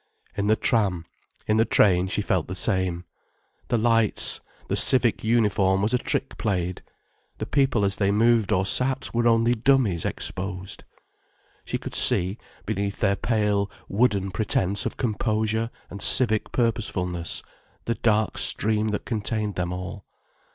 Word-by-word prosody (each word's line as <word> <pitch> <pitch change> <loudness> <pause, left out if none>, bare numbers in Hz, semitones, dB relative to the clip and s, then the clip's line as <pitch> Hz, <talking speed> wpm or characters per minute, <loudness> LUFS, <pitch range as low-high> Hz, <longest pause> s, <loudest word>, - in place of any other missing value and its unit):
In 100 0 -2
the 110 - +4
tram, 95 -8 0 0.4
in 110 - +1
the 110 - +4
train, 95 -5 +3
she 105 +2 -2
felt 95 -5 -1
the 95 - -6
same. 95 -2 +1 0.6
The 120 - 0
lights, 115 -1 +3 0.3
the - - -1
civic 125 -3 +5
uniform 105 -4 +1
was 110 +3 0
a 125 - +2
trick 135 - -3
played, 90 -4 -2 0.6
the - - -4
people 135 -7 +1
as 100 0 0
they 100 -2 +1
moved 110 0 +2
or 95 -1 +1
sat 130 +6 +1
were 120 0 +1
only 115 +1 +3
dummies 120 - +1
exposed. 95 0 -5 0.8
She - - -3
could - - -9
see, 95 +4 +2 0.3
beneath 100 +1 -3
their 100 - +1
pale, 105 -3 0 0.2
wooden 100 -3 0
pretence 100 +1 0
of - - -7
composure 110 -1 -1 0.2
and 100 +1 -8
civic 110 +1 +3
purposefulness, 90 - -1 0.4
the 115 - 0
dark 110 -2 0
stream 110 0 +1
that 105 -1 -3
contained 110 -2 -2
them 90 -1 -3
all. 90 +2 -7
105 Hz, 145 wpm, -24 LUFS, 95-115 Hz, 0.8 s, civic